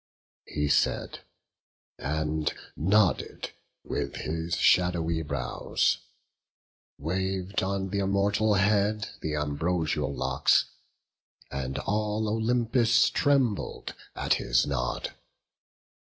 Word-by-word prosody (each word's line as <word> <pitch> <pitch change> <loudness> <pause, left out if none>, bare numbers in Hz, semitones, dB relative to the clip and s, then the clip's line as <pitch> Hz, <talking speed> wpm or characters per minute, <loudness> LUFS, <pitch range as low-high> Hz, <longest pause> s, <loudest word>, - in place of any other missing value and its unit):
He 75 0 -1
said, - - +1 0.8
and 75 +1 -1 0.2
nodded 95 +3 +1 0.3
with 70 -1 -3
his 80 +2 -2
shadowy 85 -2 +3
brows; 70 -5 0 1.0
Wav'd 95 +4 -2
on 95 0 -2
th' 100 - 0
immortal 100 +2 +2
head 105 +1 +2
th' 75 -1 -2
ambrosial 75 0 -1
locks, 65 +1 +2 0.9
And 65 0 -3
all 105 +1 -1
Olympus 120 +2 +3
trembled 135 -7 +1 0.2
at - - +1
his - - +2
nod. 65 -3 -2
90 Hz, 85 wpm, -28 LUFS, 75-105 Hz, 1.0 s, shadowy